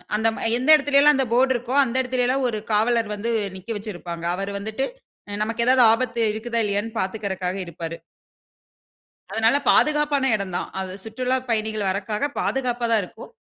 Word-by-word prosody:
அந்த 220 +1 +1
ம - - -7 0.2
எந்த 255 +4 -2
எடத்திலல்லாம் 290 0 +5
அந்த 265 0 +1
போர்ட் 260 +2 +4
இருக்கோ, 245 +1 -4
அந்த 245 -2 -4
எடத்திலல்லாம் 255 +1 0
ஒரு 215 -2 -3
காவலர் 220 +1 +2
வந்து 220 +3 -3 0.2
நிக்க 190 +3 -11
வச்சுருப்பாங்க. 175 -5 -7
அவரு 195 +2 -4
வந்துட்டு 220 +6 -3 0.4
அ - - -6
நமக்கு 230 +2 -2
ஏதாவது 255 0 +6
ஆபத்து 235 0 0
இருக்குதா? 230 +1 -2
இல்லயான்னு 210 +3 -2
பார்த்துக்குறக்காக 190 -2 -3
இருப்பாரு. 165 -1 -7 1.3
அதனால 225 +5 +3
பாதுகாப்பான 295 -3 +2
இடந்தான். 190 -4 -4
அது 190 -1 -5
சுற்றுலாப் 255 +3 -2
பயணிகள் 215 -2 -1
வரதுக்காக 210 +8 -2
பாதுகாப்பா 245 -2 -1
தான் 225 -2 +3
இருக்கும். 180 - -11
225 Hz, 150 wpm, -23 LUFS, 205-255 Hz, 1.3 s, ஏதாவது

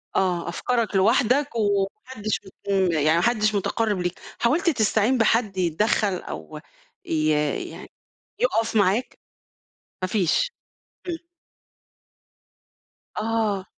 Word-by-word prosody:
آه، 180 -3 +1
أفكارك 230 +3 -1
لوحدك 250 +8 +3
وما 200 -3 +2 0.2
حدِش 215 -5 -3
ب 200 +1 -14
إمم 190 -3 +3
يعني 155 0 +3
ما - - +3
حدِش 215 -3 +2
مُتقرّب 205 0 0
ليك، 175 0 -3 0.2
حاولت 330 +10 +2
تستعين 220 -1 +2
بحد 225 -3 +2
يتدخّل، 185 +3 +1
أو 155 -1 -8 0.5
ي 155 -1 +1 0.4
يعني - - -11 0.5
يُقف 230 - +1
معاك؟ 205 +4 +1 0.8
ما 185 - 0
فيش 210 - +1 0.6
إمم. 335 -2 -2 2.0
آه. 215 -4 0
210 Hz, 110 wpm, -24 LUFS, 185-230 Hz, 2.0 s, لوحدك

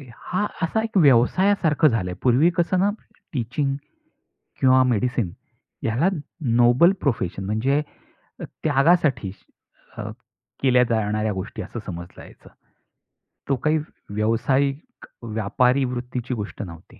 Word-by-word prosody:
हा 185 - -2 0.2
असा 200 +5 +1
एक 225 -2 -2
व्यवसायासारखं 160 +3 +4
झालं 110 -9 0
आहे. 90 - -8
पूर्वी 130 +7 +4
कसं 175 +2 +2
ना 195 +2 +3 0.4
टीचिंग 135 +2 -1 0.9
किंवा 130 0 +5
मेडिसिन 120 -4 0 0.5
याला 120 +11 +2 0.5
नोबल 120 +10 +6
प्रोफेशन 100 - -1
म्हणजे 120 +9 +1 0.6
त्यागासाठी 140 - +1 0.7
अ, - - -4 0.5
केल्या 125 -2 +5
जाणाऱ्या 110 -1 0
गोष्टी 95 +2 -5
असं - - -7
समजलं 85 -1 -8
जायचं. - - -16 1.0
तो 140 - +3
काही 155 +5 +1 0.3
व्यावसायिक 130 - -1 0.2
व्यापारी 115 +4 +1
वृत्तीची 125 0 -4
गोष्ट 105 -3 -5
नव्हती. 85 -3 -12
125 Hz, 110 wpm, -23 LUFS, 110-150 Hz, 1.0 s, नोबल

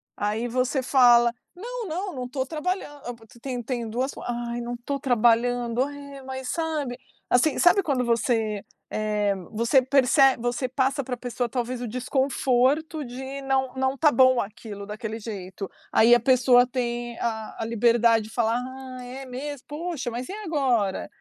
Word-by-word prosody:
aí, 210 +3 -1
você 255 +3 0
fala: 240 -2 +6 0.2
"Não, 470 +2 -6
não, 365 +4 -3
não 250 -1 -4
tô 260 0 -2
trabalhando". 325 +4 -3 0.2
A, - - -3
pa 230 -1 -17 0.2
tem 250 -2 -4
tem 235 -1 -3
duas 255 +5 -2
for - - -9
"Ai, 240 0 -3
não 240 +1 -4
tô 280 -1 -2
trabalhando, 245 -1 +2
ai 280 0 -8
é, 270 - -10
mas", 260 -1 -6
sabe, 310 -7 -2 0.3
assim, 260 +4 +3
sabe 355 +3 +5
quando 265 -6 0
você, 225 -3 0 0.3
eh, 210 -2 0 0.2
você 235 +5 +3
perce 270 +2 +3 0.2
você 245 +2 -1
passa 270 +1 0
pra 250 0 -3
pessoa 245 0 -3
talvez 245 +1 -3
o 245 - -3
desconforto 265 +4 +1
de 265 +3 -6
não 265 -1 0
não 265 0 0
tá 300 +1 +4
bom 255 0 +5
aquilo, 205 0 -8
daquele 220 +1 -5
jeito. 195 -3 -6 0.2
Aí 230 +2 +6
a - - +3
pessoa 250 0 +5
tem 240 -1 -3
a 220 -2 -3
a - - -1
liberdade 230 0 +3
de 220 - -11
falar: 230 -1 +1
"Ah, 255 0 -8
é 260 +2 -8
mesmo? 270 +2 -6
Poxa, 300 -3 -4
mas 245 +2 -5
e - - -5
agora?" 275 - 0
250 Hz, 170 wpm, -25 LUFS, 235-270 Hz, 0.3 s, fala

